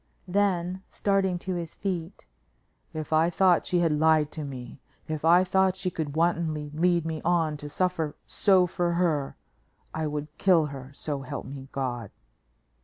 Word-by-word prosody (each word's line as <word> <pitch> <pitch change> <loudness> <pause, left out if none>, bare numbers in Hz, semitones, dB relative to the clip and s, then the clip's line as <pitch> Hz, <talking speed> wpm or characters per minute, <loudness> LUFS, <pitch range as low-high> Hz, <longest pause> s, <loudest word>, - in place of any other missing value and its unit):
Then, 185 -1 0
starting 195 -2 +1
to 185 +1 -4
his 170 -2 -5
feet: 185 -1 -4 0.7
"If 155 -1 -4
I 160 +2 +4
thought 180 -1 +3
she 175 -1 +2
had 165 -2 +2
lied 155 0 +3
to 155 - -5
me; 130 -2 -8 0.3
if 155 -1 -4
I 175 +3 +6
thought 190 0 +2
she 185 -1 -3
could 155 -4 -4
wantonly 160 -3 0
lead 170 +1 +2
me 160 -1 -3
on 165 -3 +2
to 145 0 -7
suffer 165 -2 -1
so 190 -3 +4
for 175 -1 -1
her, 160 -6 0 0.6
I 160 -1 -1
would 150 0 -5
kill 175 -5 +4
her, 135 -3 -8
so 140 0 -4
help 130 - -6
me 135 0 -8
God." 120 -5 -3
165 Hz, 165 wpm, -27 LUFS, 150-180 Hz, 0.7 s, I